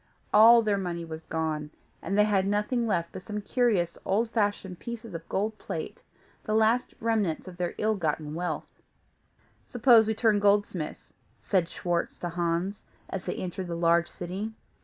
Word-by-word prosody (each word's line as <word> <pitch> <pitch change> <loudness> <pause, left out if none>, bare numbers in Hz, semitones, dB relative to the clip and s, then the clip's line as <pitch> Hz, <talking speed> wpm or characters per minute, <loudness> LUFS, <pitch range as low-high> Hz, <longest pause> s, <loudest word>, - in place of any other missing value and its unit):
All 230 +2 +8
their 205 -2 +1
money 170 -3 -3
was 160 0 -8
gone, 155 -2 -2 0.3
and 195 +4 -2
they 210 - +6
had 200 -2 +2
nothing 210 +4 0
left 170 -5 0
but - - -8
some 210 +2 -5
curious, 205 -6 +1
old 220 +4 0
fashioned 205 -5 -1
pieces 230 -3 -7
of 165 0 -8
gold 215 +2 -1
plate, - - -6 0.4
the 215 - -1
last 225 +3 +2
remnants 215 -8 0
of 180 -1 -9
their 175 -1 -2
ill 215 +1 +1
gotten 155 -4 -2
wealth. 175 +2 -4 0.9
"Suppose 235 -2 +5
we 220 - 0
turn 215 -2 +3
goldsmiths?" 200 -5 0 0.3
said 180 -4 +1
Schwartz 175 -1 -2
to 175 - -4
Hans, 170 +3 -2 0.3
as 190 -1 -4
they - - -2
entered 185 0 -4
the 170 - -3
large 170 0 +3
city. 190 +5 -5
195 Hz, 165 wpm, -28 LUFS, 170-215 Hz, 0.9 s, All